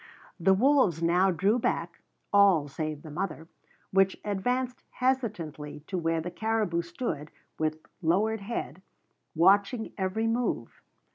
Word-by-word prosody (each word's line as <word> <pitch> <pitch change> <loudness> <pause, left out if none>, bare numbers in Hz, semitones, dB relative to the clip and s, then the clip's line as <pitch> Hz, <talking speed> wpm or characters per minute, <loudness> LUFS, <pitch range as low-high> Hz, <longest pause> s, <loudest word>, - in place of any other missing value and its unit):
The 190 +3 +4
wolves 230 - +3
now 180 +3 +4
drew 195 +7 +2
back, 170 -6 -2 0.3
all 195 -7 +5
save 155 +1 -4
the 155 - -9
mother, 165 -1 -4 0.4
which 195 0 +3
advanced 245 +5 -1
hesitatingly 190 - -2
to 190 - -5
where 165 -2 0
the 175 +2 -5
caribou 215 -4 0
stood 170 - -4 0.3
with 155 0 0 0.2
lowered 200 +6 +1
head, 195 -5 -5 0.5
watching 200 +7 +3
every 190 +4 0
move. 235 +2 -1
190 Hz, 125 wpm, -28 LUFS, 165-220 Hz, 0.5 s, all